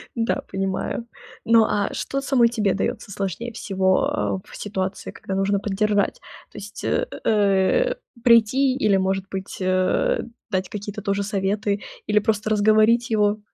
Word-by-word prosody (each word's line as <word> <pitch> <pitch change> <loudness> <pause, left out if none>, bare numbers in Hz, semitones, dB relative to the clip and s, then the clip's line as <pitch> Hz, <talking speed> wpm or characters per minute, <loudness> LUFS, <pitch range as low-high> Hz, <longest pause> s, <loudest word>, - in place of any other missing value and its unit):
Да, 230 -1 0
понимаю. 195 +4 -3 0.4
Ну, 230 -1 +5
а 205 -1 -1
что 275 - -3
самой 265 -4 +3
тебе 215 -5 0
даётся 200 - -3
сложнее 200 +5 -4
всего, 190 - 0
э, - - -26
в - - -11
ситуации, 190 -2 -4
когда 190 - -6
нужно 195 +1 +1
поддержать? 205 0 0 0.3
То - - -13
есть, 205 +1 -8
э, - - +1 0.2
э, 210 - +2 0.3
прийти 250 +3 +4
или, 210 -7 +3
может 190 0 0
быть, 190 0 -6
э, 185 - +1 0.3
дать 185 -3 -1
какие-то 210 0 -6
тоже 200 0 -1
советы, 200 0 -1 0.3
или 210 - +3
просто 215 0 -1
разговорить 215 +3 +4
его? 210 -1 +2
205 Hz, 145 wpm, -23 LUFS, 195-225 Hz, 0.4 s, Ну